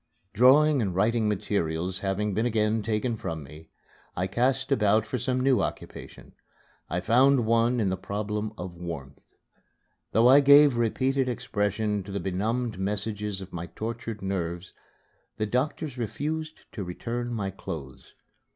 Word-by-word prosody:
Drawing 135 +5 +5
and 95 -5 -2
writing 110 +3 +2
materials 90 -3 -1
having 100 +1 -1
been 110 +5 +1
again 110 -1 +1
taken 110 +3 -1
from 80 -6 -5
me, 75 +4 -13 0.5
I 90 - 0
cast 130 +7 0
about 110 -4 +3
for 115 +4 -3
some 125 +2 0
new 130 0 +3
occupation. - - -7 0.6
I 90 +1 -1
found 125 +4 +4
one 115 +2 +2
in 100 -4 +1
the 95 - -1
problem 105 +2 -3
of 90 0 -6
warmth. 85 -6 -7 0.9
Though 115 +3 +5
I 135 +3 +8
gave 140 -1 +7
repeated 130 +3 +1
expression 105 -2 -1
to 100 +1 -9
the 100 - -2
benumbed 110 +4 -2
messages 105 0 -3
of 95 - -10
my 85 0 -5
tortured 115 +2 -6
nerves, 90 -2 -3 0.6
the 110 - 0
doctor 130 +8 -1
refused 155 +6 -4
to 105 - -5
return 120 +7 -4
my 100 -4 -2
clothes. 75 -8 -8
105 Hz, 145 wpm, -27 LUFS, 95-120 Hz, 0.9 s, I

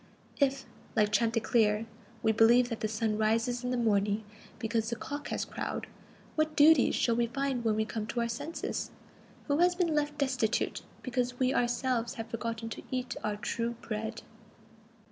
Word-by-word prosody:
If, 275 -1 +2 0.3
like 210 -1 +3
Chanticleer, 225 0 +2 0.4
we 220 - +4
believe 235 +3 +5
that 230 - -3
the 215 - 0
sun 215 0 -1
rises 230 +3 +1
in 250 - -1
the 250 - 0
morning 210 -2 +2 0.3
because 225 0 -1
the 235 - -1
cock 290 +4 -5
has - - -2
crowed, - - -4 0.5
what 310 0 +1
duties 295 -2 +6
shall 235 - +2
we 235 0 +2
find 270 0 -1
when 220 -2 +2
we 220 0 +1
come 215 -1 -4
to 235 +2 -1
our 235 - +1
senses? 295 +7 -4 0.6
Who 285 +1 +1
has 355 +1 +4
been 345 -3 +1
left 295 -1 0
destitute, 255 -5 0 0.2
because 250 -1 -1
we 255 +1 +2
ourselves 240 -1 0
have 225 0 -6
forgotten 230 -1 -3
"to - - -7
eat 255 -1 -2
our 210 -1 -1
true 230 +3 -2
bread"? 220 +1 -4
235 Hz, 170 wpm, -31 LUFS, 220-260 Hz, 0.6 s, duties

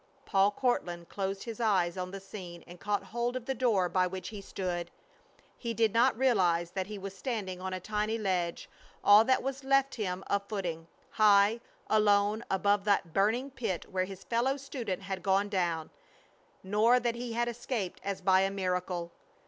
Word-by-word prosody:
Paul 195 +1 +4
Courtland 180 -7 -1
closed 195 0 -3
his 230 -2 -7
eyes 190 -7 +2
on 185 -1 -4
the 195 +1 -7
scene, 185 -3 -9
and 175 0 -12
caught 205 -1 -1
hold 240 +4 -2
of 255 -2 -4
the 265 - -1
door 225 -8 +2
by 185 +1 +2
which 185 0 -6
he 210 -3 -7
stood. 175 -3 -4 0.7
He 235 -2 -3
did 225 -2 +2
not 235 +1 +4
realize 180 -10 +2
that 190 -1 -3
he 210 0 -6
was 195 0 -7
standing 195 -5 -4
on 190 0 -3
a 185 - -3
tiny 215 +3 -1
ledge, 180 -5 -1 0.4
all 205 +2 +8
that 260 +1 +2
was 270 +1 -4
left 275 0 +3
him 190 -5 -3
of 200 - +1
footing, 175 -6 -4 0.2
high, 210 +1 +5 0.3
alone, 210 +1 +3
above 200 +1 +2
that 195 -5 +1
burning 230 +8 +1
pit 225 -10 -4
where 185 -1 0
his 195 0 -10
fellow 245 +4 0
student 250 -9 -5
had 190 -1 -4
gone 195 +2 +2
down; 170 -5 -1 0.7
nor 215 +6 +4
that 240 -1 0
he 235 0 -5
had 240 +1 0
escaped 235 -5 -4
as 200 -1 -3
by 190 0 +4
a 195 - +2
miracle. 180 -3 -2
200 Hz, 180 wpm, -30 LUFS, 185-230 Hz, 0.7 s, all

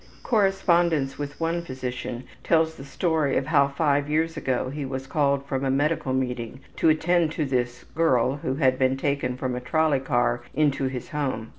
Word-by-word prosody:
Correspondence 175 - +2
with 145 0 -5
one 165 +1 0
physician 125 -4 -5 0.2
tells 160 -1 +2
the 135 - -11
story 155 0 0
of 135 - 0
how 140 -2 +4
five 140 0 0
years 160 +2 0
ago 130 0 -1
he 145 +1 -4
was 130 0 -4
called 140 -1 +1
from 135 -1 -2
a 135 - +1
medical 145 +1 0
meeting 125 -1 -2 0.2
to 165 - +4
attend 160 +1 +2
this 125 -4 -2
``girl'' 135 -4 +2
who 130 -1 -2
had 130 -3 +2
been 130 0 +2
taken 135 -2 -1
from 130 -1 -2
a 125 - -4
trolley 155 +1 +2
car 120 -2 0
into 145 -2 +2
his 130 -1 -4
home. 130 -7 -3
140 Hz, 175 wpm, -25 LUFS, 130-160 Hz, 0.2 s, how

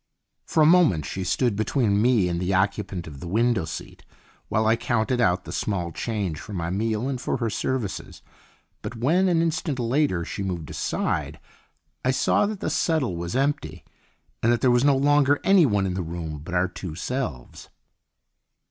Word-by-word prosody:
For 155 - +3
a - - +6
moment 155 - +4
she 95 - -4
stood 105 +5 +1
between 110 -1 +1
me 115 -6 +3
and 85 -1 -2
the 90 +2 0
occupant 95 -2 -1
of 70 -4 -10
the 85 - -7
window 115 0 +1
seat 80 - -8 0.4
while 110 0 +1
I 110 +1 +4
counted 120 +1 0
out 90 -4 +2
the - - -7
small 90 -5 -2
change 100 -5 -3
for 105 - -9
my 85 -2 -3
meal 110 +4 -1
and 130 -2 -3
for - - -1
her 115 -3 -2
services; 120 -3 -3 0.6
but - - -6
when, 160 +11 +2
an 165 -2 +3
instant 160 -3 -1
later, 120 - +1
she - - -5
moved 90 -5 -4
aside, - - -2 0.6
I 130 - +1
saw 130 +9 +2
that 210 -2 -5
the - - -1
settle 155 - 0
was 85 +4 -4
empty 145 +2 -1 0.6
and 115 - +3
that 120 - +1
there 130 - +4
was 120 +1 +3
no 140 -1 +4
longer 145 0 +3
anyone 140 - +4
in 95 - -1
the 95 - -2
room 80 -2 -5
but 80 +4 -6
our 90 +1 +2
two 90 -2 -7
selves. 90 - -5
110 Hz, 185 wpm, -24 LUFS, 90-135 Hz, 0.6 s, a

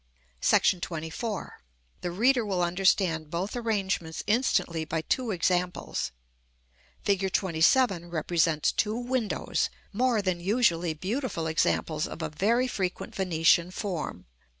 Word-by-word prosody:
§ 185 - +4
XXIV. 165 +7 -4 0.5
The 175 - -2
reader 240 +7 +3
will 190 -4 0
understand 175 -3 +2
both 180 +7 -3
arrangements 195 -8 -2
instantly 195 -7 +1
by 160 +1 -2
two 250 +7 -1
examples. 180 - -1 0.9
Fig. 195 -1 +1
XXVII. 185 +2 +3
represents 165 -2 +1
two 215 0 0
windows, 245 -2 -1 0.2
more 235 -1 +2
than 185 -2 0
usually 175 -5 +1
beautiful 195 - -3
examples 155 -1 0
of 160 - -7
a 160 - -2
very 230 +11 +1
frequent 185 -7 -3
Venetian 170 -2 +3
form. 185 -3 -4
185 Hz, 115 wpm, -28 LUFS, 165-215 Hz, 0.9 s, §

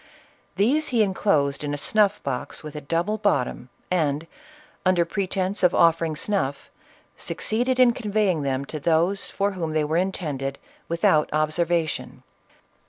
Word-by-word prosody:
These 280 +10 +2
he 235 -3 +3
en 195 -2 -1
closed 145 -9 +1
in 145 0 -2
a - - -5
snuff 210 +6 +2
box 140 +3 -4
with 150 -1 -8
a 150 - -5
double 170 +9 -1
bottom, 130 - 0 0.2
and, 155 -3 0 0.6
under 180 -2 +3
pretence 190 +1 -2
of 180 -1 +4
offering 165 -1 +3
snuff, 160 -6 -2 0.5
succeeded 250 +4 -1
in 250 -2 +6
conveying 210 -7 0
them 135 -1 -1
to 155 - -6
those 170 +6 +1
for 200 +1 -1
whom 165 -5 -4
they 155 -1 +1
were 155 +2 0
intended, 150 -7 -2 0.3
without 165 -2 +2
obser 155 +3 +1
vation. 165 -2 -2
170 Hz, 150 wpm, -24 LUFS, 150-200 Hz, 0.6 s, in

